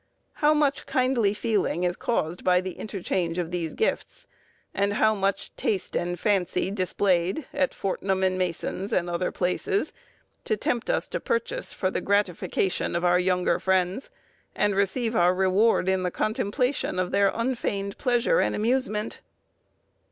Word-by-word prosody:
How 300 0 +5
much 290 -2 +1
kindly 255 -5 +2
feeling 205 -5 0
is 175 0 +1
caused 175 -7 -2
by 180 -1 +4
the 185 0 -4
interchange 180 -4 -3
of 175 -1 -2
these 170 -3 -3
gifts, 445 - -2 0.5
and 200 +1 +1
how 220 +1 +3
much 195 -1 -2
taste 195 -4 -2
and 175 0 -2
fancy 190 -1 0
displayed 185 - 0
at 280 -1 +1
Fortnum 190 0 -1
and 185 0 +2
Mason's, 185 +2 -3
and 175 -1 +1
other 175 +1 -1
places, 400 - -1 0.5
to 440 - 0
tempt 240 - -1
us - - +1
to - - -2
purchase - - -2
for 185 -1 -1
the - - -2
gratification 195 -2 0
of 170 +1 0
our 175 0 +4
younger 180 0 +1
friends, 190 +5 0 0.5
and 205 -1 +2
receive 225 +4 0
our 175 0 +4
reward 190 +2 +3
in 190 0 +2
the 180 - 0
contemplation 220 +4 -1
of 185 -1 -1
their 200 0 +4
unfeigned 220 -5 -2
pleasure 250 - +2
and - - +1
amusement! 220 -2 -1
195 Hz, 150 wpm, -26 LUFS, 180-230 Hz, 0.5 s, How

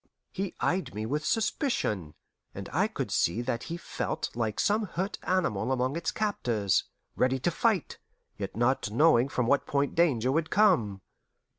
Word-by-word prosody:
He 195 -1 -4
eyed 180 - -1
me 110 +1 -3
with 150 +6 -2
suspicion, 110 - -1 0.4
and - - -6
I - - +3
could - - -4
see 90 +8 +1
that 120 -1 -2
he 170 - -3
felt - - -4
like 110 -3 -2
some 210 +1 +2
hurt 190 +3 -3
animal 125 - 0
among 130 +2 0
its 170 - -1
captors, 115 - 0 0.3
ready 130 +1 +2
to 130 +7 0
fight, 205 0 0 0.4
yet 100 -1 -5
not 120 +1 +1
knowing 125 +1 +4
from 125 -2 0
what 140 +4 +2
point 140 0 0
danger 130 -8 +2
would 160 +2 0
come. 140 - +3
135 Hz, 160 wpm, -29 LUFS, 115-175 Hz, 0.4 s, knowing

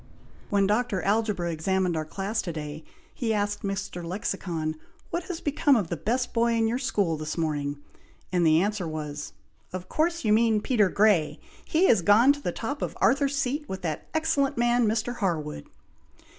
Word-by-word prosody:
When 200 -1 +3
Dr. 210 -1 0
Algebra 200 -4 0
examined 180 +2 0
our 155 -1 -2
class 200 +7 -2
to 175 - -4
day, 155 0 -6 0.3
he 225 -3 -1
asked 205 0 -1
Mr. 195 -3 -4
Lexicon, 170 -3 -3 0.4
'What 340 0 -2
has 355 -2 -5
become 290 -1 +3
of 200 -8 0
the 170 - -1
best 235 - -1
boy 235 0 +2
in 225 -1 +2
your 240 +3 -1
school 200 - 0
this 155 +1 -5
morning?' 145 -3 -1 0.5
and 180 -1 +2
the 160 +1 +5
answer 205 -4 -2
was, 150 -2 -5 0.4
'Of 185 0 -6
course 335 -2 0
your 210 - +4
mean 220 -1 +4
Peter 210 -3 +2
Grey! 175 -8 +3 0.3
He 330 +4 +2
is 220 - +5
gone 220 +10 +6
to 285 - -9
the 175 - -1
top 270 +10 -4
of - - -3
Arthur's 280 0 +2
Seat 285 +3 -2
with 190 -1 -5
that 155 -3 -3
excellent 310 -5 +1
man, 240 -1 +3
Mr. 225 +3 -1
Harwood!'" 155 - -2
205 Hz, 180 wpm, -27 LUFS, 170-240 Hz, 0.5 s, gone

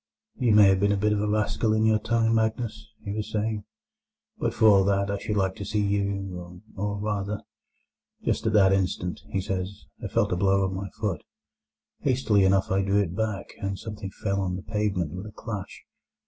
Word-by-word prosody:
"You 120 -4 +3
may 105 -2 +8
have 95 0 +3
been 100 +1 +3
a 100 - +2
bit 105 +2 +2
of 105 - 0
a 105 - 0
rascal 110 +1 +1
in 110 0 +2
your 110 -1 +4
time, 115 0 +1
Magnus," 110 0 -1
he 100 - -4
was 110 +1 -3
saying, 105 -1 -1 0.7
"but - - 0
for - - +1
all 100 -3 +7
that 100 0 +1
I 100 - -2
should 105 +1 -2
like 95 -1 +1
to - - -5
see 105 +1 0
you, 100 -3 -2 0.2
or, 100 +1 -2
rather—" 105 0 -2 0.8
"Just - - 0
at - - +1
that 95 -2 +6
instant," 90 -2 -1
he 95 - -1
says, 95 +1 -4 0.2
"I - - -1
felt 105 +1 +1
a - - +2
blow 95 +1 +3
on 95 - -2
my 95 +1 -4
foot. 100 -8 -1 0.8
Hastily 120 -7 +2
enough 95 0 +2
I 95 +1 +3
drew 100 +1 +1
it 90 -3 -1
back, 105 -2 -2
and 100 0 -2
something 105 -1 -6
fell 100 0 -2
on 90 -1 -1
the 95 - -6
pavement 105 -6 -1
with 95 +4 -6
a - - -9
clash. 105 -2 -7
100 Hz, 205 wpm, -26 LUFS, 95-105 Hz, 0.8 s, may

